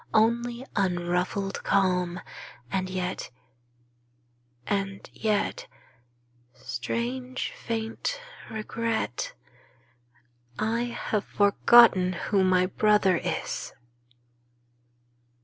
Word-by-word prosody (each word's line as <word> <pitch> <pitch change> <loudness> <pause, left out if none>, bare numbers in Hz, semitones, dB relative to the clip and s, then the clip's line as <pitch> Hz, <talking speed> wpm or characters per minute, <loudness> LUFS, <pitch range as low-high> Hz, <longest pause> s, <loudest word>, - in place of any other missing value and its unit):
Only 235 +3 +2
unruffled 180 +1 0
calm; 180 -2 +1 0.5
and 185 -1 -1
yet 185 0 -3 0.7
— 120 0 -41
and 195 -1 -2
yet 215 -2 -1 0.5
— 120 0 -38
Strange, 240 - -3
faint 225 - -3 0.3
regret 220 - -2 0.7
— 120 0 -37
I 230 +2 0
have 220 -3 -2
forgotten 200 -2 +5
who 195 +2 +1
my 185 -1 +4
brother 200 -1 +3
is! - - -3
190 Hz, 80 wpm, -27 LUFS, 165-220 Hz, 0.7 s, forgotten